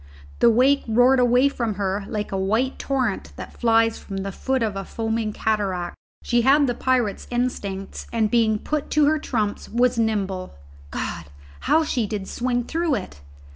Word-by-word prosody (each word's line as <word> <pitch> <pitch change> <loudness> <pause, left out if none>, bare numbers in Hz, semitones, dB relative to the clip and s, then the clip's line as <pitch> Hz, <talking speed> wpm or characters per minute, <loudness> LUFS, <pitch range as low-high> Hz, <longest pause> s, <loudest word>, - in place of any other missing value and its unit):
The 235 - +6
wake 260 +5 +4
roared 245 +4 +4
away 250 +2 +4
from 235 -6 -2
her 195 0 -2
like 210 -1 -4
a - - -2
white 220 +8 0
torrent 255 -7 -2
that - - -10
flies 225 -1 +3
from 195 - -7
the 195 +1 -3
foot 265 +4 -1
of 215 -3 -1
a 195 - -3
foaming 225 +1 -2
cataract. 200 -5 -1 0.3
She 240 -1 +2
had 280 +4 +5
the 245 - 0
pirate's 245 -4 0
instincts, 205 -6 -3
and 220 -2 +1
being 225 -2 +3
put 300 +6 -3
to 300 - +6
her 310 +1 +2
trumps, 215 -8 -2
was 240 0 +2
nimble. 195 - -1 0.3
God! 80 +3 -4 0.4
how 320 - +5
she 245 -7 -1
did 200 -2 -4
swing 245 0 -1
through 325 +2 0
it! 185 - -7
230 Hz, 175 wpm, -23 LUFS, 205-255 Hz, 0.4 s, The